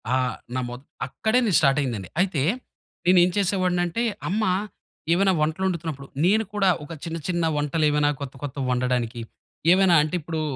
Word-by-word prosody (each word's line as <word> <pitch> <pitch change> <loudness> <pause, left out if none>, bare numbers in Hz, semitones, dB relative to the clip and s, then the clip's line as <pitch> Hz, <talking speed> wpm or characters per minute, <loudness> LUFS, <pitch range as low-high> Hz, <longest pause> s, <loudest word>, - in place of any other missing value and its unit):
ఆహ్, 130 -1 0 0.2
నమోత్ 125 0 -4 0.2
అక్కడేని 220 - +1
స్టార్టయిందండి. 135 - +1
అయితే 180 -7 0 0.6
నేను 180 0 +6
ఏం 180 - +3
చేసేవాడినింటే, 185 +1 +1 0.3
అమ్మ 215 +3 0 0.7
ఏవైనా 190 +1 +3
వంటలు 160 +5 0
వండుతున్నప్పుడు, 160 -6 -4 0.2
నేను 215 +4 +4
కూడా 195 -2 +3
ఒక 155 +3 -8
చిన్న, 165 0 -4
చిన్న 175 -2 0
వంటలు 150 +2 0
ఏవైనా 150 0 +2
కొత్త, 135 -2 -5
కొత్త 145 0 -5
వండడానికి, 125 -2 -1 0.5
ఏవైనా 190 -2 +5
అంటే, 155 +4 -3
ఇప్పుడు 160 +1 -4
165 Hz, 140 wpm, -24 LUFS, 135-185 Hz, 0.7 s, నేను